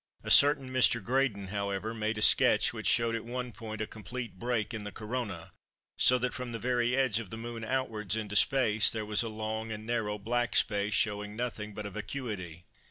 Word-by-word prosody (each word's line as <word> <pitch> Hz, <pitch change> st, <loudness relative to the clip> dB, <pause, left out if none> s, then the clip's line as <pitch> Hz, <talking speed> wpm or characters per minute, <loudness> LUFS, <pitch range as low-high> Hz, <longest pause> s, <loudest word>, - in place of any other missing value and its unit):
A -, -, -3 dB
certain 140 Hz, -2 st, +5 dB
Mr. 130 Hz, -2 st, +4 dB
Graydon, 115 Hz, -5 st, 0 dB
however, 100 Hz, +2 st, -2 dB
made 110 Hz, -1 st, -2 dB
a 105 Hz, -, +3 dB
sketch -, -, +5 dB
which -, -, -4 dB
showed 115 Hz, -1 st, +3 dB
at 115 Hz, -, -2 dB
one 125 Hz, +1 st, -4 dB
point 110 Hz, -2 st, -7 dB
a -, -, 0 dB
complete 110 Hz, 0 st, -7 dB
break 120 Hz, -3 st, -1 dB
in 110 Hz, -2 st, -4 dB
the 105 Hz, -, -6 dB
Corona 105 Hz, -5 st, -5 dB, 0.4 s
so 125 Hz, -, +5 dB
that 125 Hz, 0 st, -1 dB
from 125 Hz, -2 st, -5 dB
the -, -, -2 dB
very 120 Hz, 0 st, +1 dB
edge 130 Hz, -5 st, +2 dB
of 110 Hz, -5 st, -7 dB
the 110 Hz, -, -6 dB
Moon 115 Hz, 0 st, -6 dB
outwards 110 Hz, -5 st, -1 dB
into 105 Hz, -2 st, -4 dB
space, 110 Hz, -3 st, +4 dB
there 110 Hz, -2 st, -2 dB
was 105 Hz, +1 st, +1 dB
a 115 Hz, -, -2 dB
long 110 Hz, +1 st, -4 dB
and 110 Hz, 0 st, -6 dB
narrow 110 Hz, -3 st, -1 dB
black 120 Hz, +3 st, -1 dB
space 105 Hz, -1 st, +2 dB
showing 105 Hz, +1 st, -1 dB
nothing 110 Hz, -3 st, -4 dB
but 105 Hz, -, -5 dB
a 100 Hz, -, -5 dB
vacuity. 105 Hz, -, -6 dB
110 Hz, 205 wpm, -30 LUFS, 105-120 Hz, 0.4 s, certain